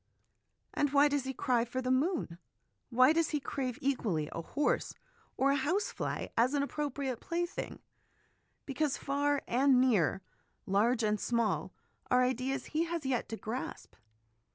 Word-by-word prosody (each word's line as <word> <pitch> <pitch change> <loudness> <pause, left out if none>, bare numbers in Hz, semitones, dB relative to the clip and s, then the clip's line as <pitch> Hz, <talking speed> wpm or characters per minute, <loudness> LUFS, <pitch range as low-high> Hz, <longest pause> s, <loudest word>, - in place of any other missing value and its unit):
And 290 -1 0
why 290 +1 +6
does 285 -2 0
he 265 - -3
cry 240 -2 +1
for 245 +2 -4
the 255 0 -1
moon? 260 - 0 0.5
Why 255 +4 +5
does 330 -1 +2
he 300 - 0
crave 260 -3 -3
equally, 200 - 0
a 165 - -4
horse 290 - -1 0.4
or 275 +1 +3
a - - +3
house 315 +10 0
fly - - -4
as 250 +5 +3
an 280 - +2
appropriate 280 -4 -3
plaything? 345 +1 -4 0.8
Because 285 +1 -1
far 285 0 0
and 260 +1 +4
near, 205 - +2 0.4
large 225 +5 +2
and 210 -1 +1
small, 235 -1 0 0.4
are 250 0 +4
ideas 255 +2 -1
he 320 +2 +2
has 335 -3 -4
yet 260 -2 -1
to 225 - -4
grasp. 230 +5 -6
265 Hz, 155 wpm, -32 LUFS, 240-290 Hz, 0.8 s, why